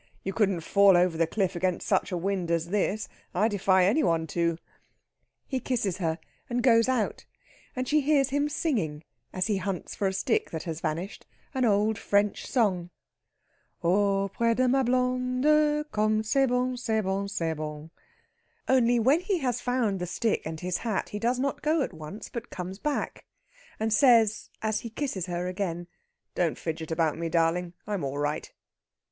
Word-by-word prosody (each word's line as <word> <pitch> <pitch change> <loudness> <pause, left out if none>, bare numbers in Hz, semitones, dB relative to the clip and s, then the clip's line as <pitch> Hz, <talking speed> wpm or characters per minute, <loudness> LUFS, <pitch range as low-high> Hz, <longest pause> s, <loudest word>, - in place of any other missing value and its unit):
"You 195 - -3
couldn't 195 -5 +1
fall 200 +2 +5
over 175 -1 +3
the 165 0 +2
cliff 190 0 -1
against 180 0 -1
such - - +1
a 180 - -1
wind 185 -1 -2
as 170 0 0
this. 210 +2 0 0.3
I 205 +5 +3
defy 190 -3 +3
any 220 +12 +3
one 165 - +1
to." 170 -1 +1 0.9
He 265 - -2
kisses 225 -8 -1
her 165 -4 -1 0.3
and 245 0 -1
goes 230 -1 +5
out, 250 -4 -1 0.5
and 255 0 -2
she 305 +2 +3
hears 280 -1 +3
him 285 +1 +1
singing, 210 - -1 0.3
as 185 0 -1
he 210 -3 +1
hunts 190 -1 -4
for 200 - -1
a 190 - -1
stick 190 - 0
that 160 -1 -5
has 165 -2 -5
vanished, 170 +6 -4 0.3
an 260 -2 +1
old 210 0 +2
French 205 0 +1
song: 190 -8 +1 0.9
"Auprès 200 +5 +2
de 255 +1 +2
ma 270 +2 +3
blond 255 +1 0
e 300 0 +4
Comme 215 0 +1
c'est 270 +5 +2
bon 250 +1 0
c'est 225 -3 0
bon 195 0 -1
c'est 165 -5 -1
bon...." 155 0 -6 0.8
Only, 245 -2 +4
when 265 +8 +4
he 375 +1 -1
has 250 -6 -1
found 240 -6 0
the 180 - -3
stick 220 +5 0
and 160 0 -6
his 180 0 -1
hat, 220 -5 -2
he 210 - -5
does 240 +3 +1
not 275 +2 -2
go 310 -1 +2
at - - -5
once, 160 +6 -8
but 235 -1 -7
comes 185 +2 -6
back, 295 +3 -3 0.5
and 220 0 0
says, 225 -3 +4
as 220 -1 0
he 230 - -7
kisses 225 - -3
her 175 0 -2
again: 180 -2 -3 0.5
"Don't 170 -3 0
fidget 160 -1 -4
about 160 -1 0
me, 165 0 -2
darling; 170 +1 +1
I'm 205 -5 -3
all 140 +1 -3
right." 145 +1 -2
205 Hz, 180 wpm, -27 LUFS, 175-250 Hz, 0.9 s, fall